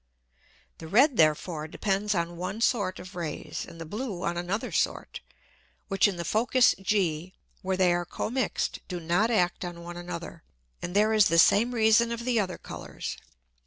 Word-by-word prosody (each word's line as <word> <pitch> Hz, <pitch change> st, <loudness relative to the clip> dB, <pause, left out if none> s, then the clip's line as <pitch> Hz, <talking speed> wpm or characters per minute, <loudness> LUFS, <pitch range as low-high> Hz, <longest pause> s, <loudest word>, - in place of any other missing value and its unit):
The 160 Hz, -, -8 dB
red 250 Hz, -, +4 dB
therefore 155 Hz, 0 st, +2 dB
depends 200 Hz, +4 st, -1 dB
on 170 Hz, 0 st, -2 dB
one 185 Hz, +5 st, -4 dB
sort 205 Hz, -6 st, +1 dB
of 180 Hz, +1 st, -10 dB
Rays, 165 Hz, -4 st, -5 dB
and 165 Hz, -, -13 dB
the 165 Hz, -, -6 dB
blue 205 Hz, 0 st, -5 dB
on 170 Hz, -, -1 dB
another 175 Hz, +5 st, -3 dB
sort, -, -, -1 dB, 0.7 s
which 195 Hz, +1 st, +4 dB
in 200 Hz, -, -2 dB
the 170 Hz, 0 st, -5 dB
Focus 245 Hz, +6 st, +3 dB
G 185 Hz, -3 st, 0 dB, 0.3 s
where 190 Hz, 0 st, -1 dB
they 180 Hz, -2 st, +4 dB
are 175 Hz, 0 st, 0 dB
commix'd, 240 Hz, +8 st, -2 dB
do 180 Hz, -2 st, -4 dB
not 175 Hz, +7 st, +1 dB
act 185 Hz, -5 st, +1 dB
on 175 Hz, -1 st, -7 dB
one 175 Hz, 0 st, -8 dB
another. 170 Hz, -1 st, -7 dB, 0.4 s
And 175 Hz, -, -5 dB
there 215 Hz, +2 st, +4 dB
is 215 Hz, -2 st, +5 dB
the 165 Hz, -, +2 dB
same 230 Hz, +8 st, +5 dB
Reason 225 Hz, +1 st, +4 dB
of 235 Hz, 0 st, -4 dB
the 245 Hz, -3 st, +2 dB
other 185 Hz, -3 st, -2 dB
Colours. -, -, -7 dB
185 Hz, 175 wpm, -27 LUFS, 175-215 Hz, 0.7 s, is